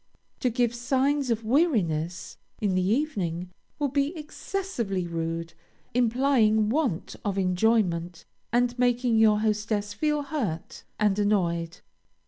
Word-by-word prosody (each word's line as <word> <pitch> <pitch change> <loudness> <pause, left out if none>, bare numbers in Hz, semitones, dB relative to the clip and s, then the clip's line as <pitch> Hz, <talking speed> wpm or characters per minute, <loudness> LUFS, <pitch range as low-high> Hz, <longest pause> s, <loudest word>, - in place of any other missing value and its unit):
To 255 - +1
give 240 0 +1
signs 265 +3 +1
of 225 -1 -1
weariness 185 - +1 0.2
in 205 -3 0
the 185 - +2
evening 185 - -1 0.3
will 290 -2 0
be 280 +5 0
excessively 300 - -3
rude, 165 0 -3 0.4
implying 235 -3 +3
want 255 - -1
of 200 -1 -2
enjoyment, 180 -3 +1 0.3
and 245 +1 +1
making 245 -2 +2
your 215 -1 +5
hostess 210 -1 -1
feel 300 +6 0
hurt 235 - -4
and 210 -1 +2
annoyed. 170 -5 0
220 Hz, 115 wpm, -27 LUFS, 185-255 Hz, 0.4 s, your